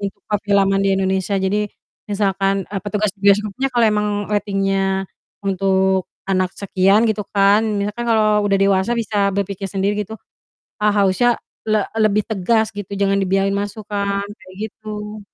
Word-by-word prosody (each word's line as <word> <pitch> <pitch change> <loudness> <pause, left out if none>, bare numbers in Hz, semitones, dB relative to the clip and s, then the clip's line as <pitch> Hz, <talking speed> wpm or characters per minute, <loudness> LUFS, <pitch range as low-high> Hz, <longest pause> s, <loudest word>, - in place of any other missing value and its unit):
untuk 200 0 -5
per 210 - +2
filman 200 -1 +3
di 195 - +3
Indonesia. 190 +1 0
Jadi 200 +2 0 0.4
misalkan, 195 -1 0
eee, 200 -2 -4
petugas 210 0 0
bioskopnya 210 +5 +2
kalau 240 -1 +4
emang 210 -1 +2 0.2
rating-nya 195 -1 0 0.4
untuk 190 -1 +1 0.2
anak 185 -1 0
sekian 195 +1 +3
gitu 215 -1 -2
kan, 200 +2 +4 0.2
misalkan 210 +4 -3
kalau 215 -2 +3
udah 200 - +2
dewasa 195 +3 +2
bisa 205 -4 0
berpikir 200 0 -2
sendiri 200 +1 -1
gitu, 220 - -8 0.7
ha 210 - +2
harusnya 205 +5 +3 0.3
le 215 -1 +2 0.2
lebih 210 -1 +3
tegas 220 +2 0
gitu 205 -3 -7
jangan 195 0 +1
dibiarin 195 +1 +1
masuk 205 +2 -3
kan, 200 -1 -1
kayak 190 -2 -12 0.2
gitu. 210 0 -7
200 Hz, 150 wpm, -19 LUFS, 195-210 Hz, 0.7 s, kalau